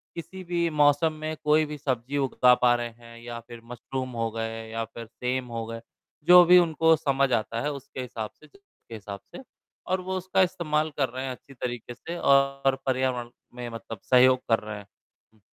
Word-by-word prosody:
किसी 170 +3 -8
भी 170 -1 0
मौसम 150 +1 +3
में 155 0 -3
कोई 155 +1 +4
भी 150 0 -6
सब्ज़ी 130 -1 -2
उगा 130 -2 +4
पा 125 -1 +5
रहे 120 0 -3
हैं 115 0 -15
या 120 0 -7
फ़िर 115 0 -12
मशरुम 130 +2 -5
हो 115 - 0
गए 115 0 -4
या 115 0 -3
फ़िर 115 +1 -10
सेम 125 +3 -3
हो 115 - -3
गए। 115 0 -7 0.5
जो 180 0 +10
भी 180 +1 +8
उनको 165 -1 +4
समझ 140 -2 +1
आता 115 +1 -1
है 150 +3 -1
उसके 135 -1 -7
हिसाब 115 -4 -5
से 155 - -17
ज - - -31
के 200 -11 -15
हिसाब 100 -2 -8 0.2
से - - -9 0.4
और 185 0 0
वो 185 +1 -3
उसका 185 +1 +1
इस्तेमाल 160 -4 0
कर 135 -3 +1
रहे 130 +2 -5
हैं 130 - -3
अच्छी 135 +2 -12
तरीके 120 -1 -5
से 170 +8 -7
और 140 -2 +3
पर्यावरण 130 -2 0 0.3
में 125 -1 -6
मतलब 115 -2 -8
सहयोग 130 0 +5
कर 115 - +4
रहे 105 -1 -7
हैं। 105 - -11 0.5
हुँ। 110 - -27
130 Hz, 205 wpm, -26 LUFS, 115-155 Hz, 0.5 s, जो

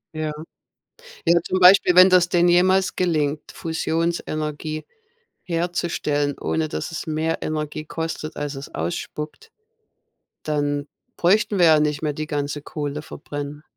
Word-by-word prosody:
Ja. 155 -1 -2 0.9
Ja, 170 0 +4
zum 185 +2 -1
Beispiel, 180 -1 +7
wenn 185 +1 +9
das 180 -1 +5
denn 175 0 +3
jemals 185 +2 +3
gelingt, 155 -4 -1
Fusionsenergie 160 -2 -2 0.6
herzustellen, 165 -4 -1
ohne 160 -1 -1
dass - - -4
es 165 - -5
mehr 160 +1 -1
Energie 155 0 -3
kostet, 160 -1 -5
als 145 -1 -4
es 135 - -9
ausspuckt, 150 - -5 0.9
dann 145 -1 -1 0.3
bräuchten 200 +2 +2
wir 175 - +6
ja 155 -2 +6
nicht 150 -1 0
mehr 150 -2 -1
die 155 +1 -5
ganze 145 -1 -3
Kohle 150 0 -4
verbrennen. 145 0 -7
155 Hz, 130 wpm, -22 LUFS, 150-175 Hz, 0.9 s, wenn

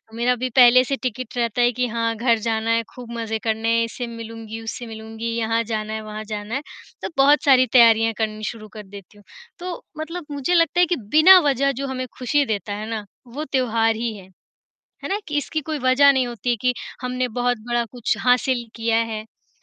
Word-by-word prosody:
मेरा 245 +2 +1
भी 255 +1 -3
पहले 255 0 +7
से 275 +2 -2
टिकट 255 0 -4
रहता 235 0 0
है 240 0 +4
कि 250 +1 -1
हाँ, 230 0 -1
घर 230 0 +2
जाना 225 0 -1
है 230 0 +2
खूब 245 -2 -9
मज़े 225 -1 -3
करने 225 0 -1
हैं, 230 - +2
इससे 240 +1 -6
मिलूँगी, 225 -1 -8
उससे 225 +2 -6
मिलूँगी, 225 +1 -7
यहाँ 230 0 0
जाना 215 -1 -4
है, 220 - -4
वहाँ 215 0 -7
जाना 210 +2 -4
है, 270 - -2 0.4
तो - - -4
बहुत 285 +2 +5
सारी 255 -2 +5
तैयारियाँ 225 -2 +6
करनी 215 -1 -3
शुरू 215 -2 -11
कर 215 - -8
देती 200 +1 -13
हूँ। 205 - -18 0.4
तो 355 -1 -6 0.2
मतलब 330 +1 -5
मुझे 285 +5 -1
लगता 335 0 +3
है 355 - +6
कि 350 - 0 0.2
बिना 370 +4 +9
वजह 275 +1 +1
जो 275 - -3
हमें 255 -1 -3
खुशी 280 +3 +1
देता 205 -2 -3
है 215 +2 -5
ना, 220 -2 -4 0.2
वो 285 +6 -6
त्योहार 225 -4 +1
ही 230 -1 -3
है। 190 -1 -14 0.7
है - - -4
ना? 400 - 0
कि 295 -1 -2
इसकी 310 +2 -2
कोई 305 0 -4
वज़ह 260 +2 +5
नहीं 260 -2 +1
होती 240 +1 -4
है 240 - +3
कि, 250 0 +2 0.3
हमने 250 0 -2
बहुत 245 +1 -1
बड़ा 240 0 +1
कुछ 245 -3 -1
हासिल 250 0 +2
किया 225 0 +1
है, 230 -1 -1
है 220 - -23
235 Hz, 215 wpm, -22 LUFS, 225-255 Hz, 0.7 s, बिना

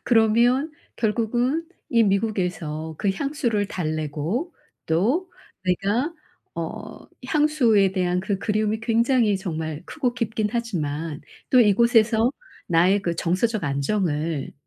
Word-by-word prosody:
그러면 240 +6 +3 0.2
결국은 240 +7 0 0.2
이 230 -1 +4
미국에서 180 -7 -1
그 205 - +1
향수를 235 -2 -1
달래고 160 - -3 0.3
또 245 - +1 0.3
내가 205 - 0 0.4
어 - - -6 0.3
향수에 250 - +3
대한 180 -1 0
그 190 +1 -2
그리움이 215 +2 0
굉장히 230 -2 +2
정말 160 -4 -4
크고 255 -6 -2
깊긴 220 -3 -1
하지만 165 -9 -3 0.3
또 255 - +6
이곳에서 230 +1 +4 0.4
나의 180 +4 +3
그 170 -2 -1
정서적 195 +3 0
안정을 150 0 -1
210 Hz, 235 characters per minute, -24 LUFS, 175-235 Hz, 0.4 s, 또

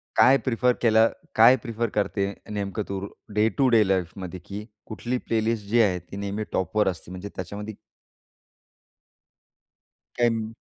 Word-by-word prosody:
काय 135 +2 +6
प्रिफर 125 +1 +3
केलं 110 -1 +5 0.2
काय 115 +4 +8
प्रिफर 115 -2 -2
करते 100 -1 +1 0.3
नेमकं 100 +1 -2
तू 100 -1 -2 0.4
डे 110 +1 +5
टु 135 -2 +4
डे 110 - +6
लाईफमध्ये? 95 -1 -2
की 100 +4 -8 0.2
कुठली 120 +3 -3
प्लेलिस्ट 110 -1 0
जी 120 +1 +4
आहे 90 -4 +2
ती 90 +4 -11
नेहमी 100 +2 -3
टॉपवर 105 +2 +1
असते? 90 -1 -4
म्हणजे 95 +2 -7
त्याच्यामध्ये 105 +3 -6 2.4
काही 115 -2 0
105 Hz, 135 wpm, -25 LUFS, 100-115 Hz, 2.4 s, काय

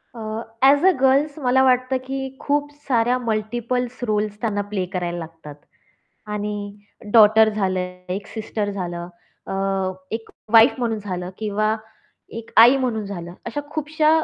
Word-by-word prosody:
A, - - -8 0.4
as 285 +3 +6
a 380 - +7
girls 275 +3 +3
मला 265 -1 +3
वाटतं 255 0 +3
की 270 +1 -3 0.2
खूप 290 0 0 0.2
साऱ्या 245 -1 +2
मल्टिपलस् 240 +2 -2
रोल्स 210 -1 -1
त्यांना 205 -3 0
प्ले 190 -3 -1
करायला 175 -1 -2
लागतात 160 -3 -9 0.8
आणि 210 0 -2 0.6
डॉटर 220 0 +7
झालं, 190 -3 -1 0.3
एक 195 +3 -4
सिस्टर 215 -2 -3
झालं, 175 -3 -5 0.4
अ, - - -4 0.6
एक 225 - -8 0.2
वाईफ 225 +3 +8
म्हणून 230 -3 -1
झालं 180 -3 -5
किंवा 215 0 0 0.6
एक 230 - -8
आई 240 +4 +8
म्हणून 235 -5 -1
झालं. 175 -3 -7
अशा 290 - -3
खूपश्या 310 0 +1
220 Hz, 140 wpm, -22 LUFS, 205-255 Hz, 0.8 s, वाईफ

